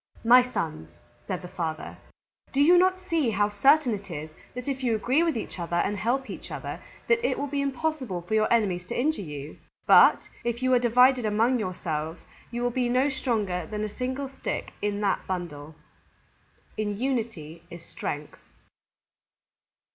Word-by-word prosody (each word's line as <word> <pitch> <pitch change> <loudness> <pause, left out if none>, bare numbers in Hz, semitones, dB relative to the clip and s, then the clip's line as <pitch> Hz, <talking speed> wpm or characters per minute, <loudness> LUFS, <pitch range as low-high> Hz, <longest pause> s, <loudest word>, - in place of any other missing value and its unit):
"My 245 +2 +8
Sons," 160 - -4 0.4
said 185 0 -3
the - - -6
Father, 160 -3 -5 0.5
"do 275 - -1
you 320 +5 +7
not 370 +1 +4
see 330 -8 0
how 205 -1 +1
certain 270 +5 +4
it 200 -1 -6
is 155 -1 -6 0.2
that 250 +1 -6
if 270 -1 -2
you 235 -3 +2
agree 255 +8 +2
with 330 -6 +1
each 215 - -6
other 170 0 -3
and 190 +4 +1
help 245 +6 -1
each - - -8
other, - - -5 0.3
it 470 0 +2
will 285 - -1
be 285 0 -2
impossible 270 - -2
for 175 - -5
your 215 0 +2
enemies 200 -7 +2
to - - -3
injure 300 -2 +1
you? 150 -3 -8 0.3
But - - +6 0.2
if 235 +1 -2
you 255 0 +3
are 250 - +5
divided 250 +1 +4
among 225 +4 +2
yourselves, 165 -4 -4 0.3
you 240 +1 -3
will 245 - +1
be 245 0 0
no 255 +3 +3
stronger 210 - -1
than 210 +3 -4
a 215 - -2
single 260 +2 -3
stick 270 - -5
in 205 0 -1
that 200 -2 0
bundle." 160 -5 -5 1.0
_In 205 -1 -1
unity 225 - -3
is 170 0 -11
strength. 145 +1 -6
225 Hz, 170 wpm, -27 LUFS, 180-260 Hz, 1.0 s, My